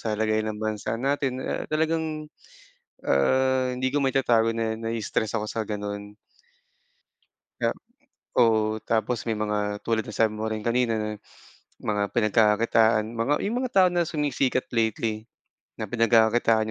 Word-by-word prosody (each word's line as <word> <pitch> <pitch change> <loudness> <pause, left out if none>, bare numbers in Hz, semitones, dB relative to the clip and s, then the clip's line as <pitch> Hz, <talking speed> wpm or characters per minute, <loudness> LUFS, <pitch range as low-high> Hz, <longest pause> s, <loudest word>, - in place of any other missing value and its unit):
sa 110 -2 -2
lagay 110 0 +1
ng 110 -1 -3
bansa 110 0 -2
natin, 135 0 -1
ah, - - -3
talagang, 155 -1 -1 0.8
ah, 130 - +2
hindi 130 +1 -1
ko 145 - +1
maitatago 120 -4 +2
na 115 -1 -2
nai-stress 115 -1 -2
ako 105 -1 -2
sa 110 -1 -2
gano'n. 105 0 -5 1.4
Um. - - 0 0.6
Oo, 110 -2 +3
tapos 115 +1 -1
may 110 - 0
mga 105 -1 -2
tulad 115 -1 +1
ng 110 - -7
sabi 110 -2 +3
mo 110 +1 -3
rin 110 -1 -4
kanina 120 -1 +1
na 105 0 -2 0.8
mga 105 -1 0
pinagkakakitaan. 110 0 +3
Mga 115 +4 0
yung 225 +4 -1
mga 255 - -3
tao 185 -2 +6
na 175 -2 +1
sumisikat 140 -4 0
lately, 110 -1 -1 0.5
na - - -3
pinagkakakitaan 115 -1 +3
115 Hz, 140 wpm, -25 LUFS, 110-125 Hz, 1.4 s, tao